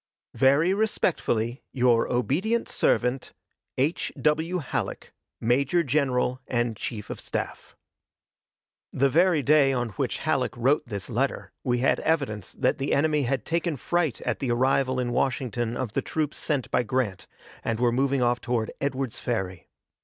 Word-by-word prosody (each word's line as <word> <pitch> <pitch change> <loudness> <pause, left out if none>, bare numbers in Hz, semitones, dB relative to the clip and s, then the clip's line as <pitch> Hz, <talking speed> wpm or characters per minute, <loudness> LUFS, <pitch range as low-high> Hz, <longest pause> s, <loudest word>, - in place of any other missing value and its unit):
Very 140 +7 +4
respectfully, 140 - 0
your 120 -3 +2
obedient 160 - 0
servant, 125 +2 0 0.4
H. 145 +6 0
W. 160 +4 +1
HALLECK, 150 -7 -4 0.3
Major 140 +9 +2
General 130 -3 +1
and 120 -2 0
Chief 105 0 -5
of - - -6
Staff. - - -5 1.2
The 140 +1 +2
very 170 -1 +4
day 145 0 +5
on 120 -3 -1
which 95 - -2
Halleck - - -1
wrote 135 +4 +2
this 100 -3 -5
letter 130 +4 -2
we 120 -1 0
had - - +3
evidence 130 - -1
that - - 0
the 135 - +1
enemy 150 -1 +2
had 135 -1 -1
taken 170 -2 -1
fright 160 - 0
at - - -2
the 135 - -2
arrival 130 +1 +2
in 120 -1 -1
Washington 120 -3 -1
of 120 -5 -3
the - - +1
troops 155 -2 -2
sent 140 -5 -2
by - - +3
Grant, 120 -4 -2 0.4
and 115 0 -1
were 120 -1 +3
moving 135 +1 +1
off 120 0 +1
toward 115 -3 -1
Edwards 135 -3 -2
Ferry. 95 -7 -3
130 Hz, 150 wpm, -26 LUFS, 120-150 Hz, 1.2 s, day